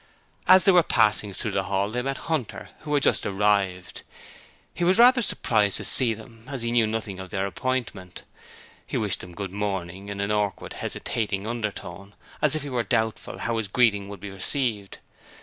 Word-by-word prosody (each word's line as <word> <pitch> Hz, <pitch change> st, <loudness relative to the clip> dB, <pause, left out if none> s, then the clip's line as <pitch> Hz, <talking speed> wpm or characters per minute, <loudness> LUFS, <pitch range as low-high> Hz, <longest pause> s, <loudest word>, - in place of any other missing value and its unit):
As 185 Hz, 0 st, +8 dB
they 195 Hz, -, +6 dB
were 180 Hz, -1 st, +7 dB
passing 105 Hz, -7 st, +2 dB
through 95 Hz, -, -4 dB
the -, -, -1 dB
hall 100 Hz, +2 st, 0 dB
they 125 Hz, +2 st, -1 dB
met 135 Hz, +1 st, -2 dB
Hunter, 155 Hz, -9 st, -3 dB
who 150 Hz, -1 st, -5 dB
had 140 Hz, -, +2 dB
just -, -, +3 dB
arrived. 95 Hz, -2 st, 0 dB, 0.7 s
He 175 Hz, -, -3 dB
was 185 Hz, +3 st, +4 dB
rather 245 Hz, +2 st, +7 dB
surprised 105 Hz, -, +1 dB
to -, -, -5 dB
see 120 Hz, -4 st, +2 dB
them, 115 Hz, +1 st, -14 dB
as 135 Hz, -4 st, -5 dB
he 115 Hz, -, -1 dB
knew 120 Hz, -2 st, +3 dB
nothing 110 Hz, -3 st, -4 dB
of 95 Hz, -1 st, -8 dB
their 95 Hz, 0 st, -1 dB
appointment. 100 Hz, -3 st, -3 dB, 0.6 s
He -, -, -2 dB
wished 105 Hz, -3 st, 0 dB
them 90 Hz, -1 st, -10 dB
'Good 100 Hz, -1 st, -5 dB
morning' 95 Hz, -1 st, -4 dB
in 100 Hz, -1 st, -5 dB
an 100 Hz, +1 st, -1 dB
awkward 105 Hz, -2 st, -1 dB
hesitating 100 Hz, -3 st, -2 dB
undertone 100 Hz, -4 st, -5 dB, 0.3 s
as 150 Hz, -1 st, +3 dB
if 155 Hz, -, -2 dB
he 145 Hz, -, -5 dB
were 125 Hz, -2 st, 0 dB
doubtful 110 Hz, -1 st, -1 dB
how 115 Hz, -1 st, -2 dB
his 110 Hz, -, -2 dB
greeting 105 Hz, -2 st, +2 dB
would 100 Hz, -2 st, -8 dB
be 100 Hz, +1 st, -7 dB
received. 105 Hz, 0 st, -1 dB
105 Hz, 190 wpm, -25 LUFS, 100-125 Hz, 0.7 s, As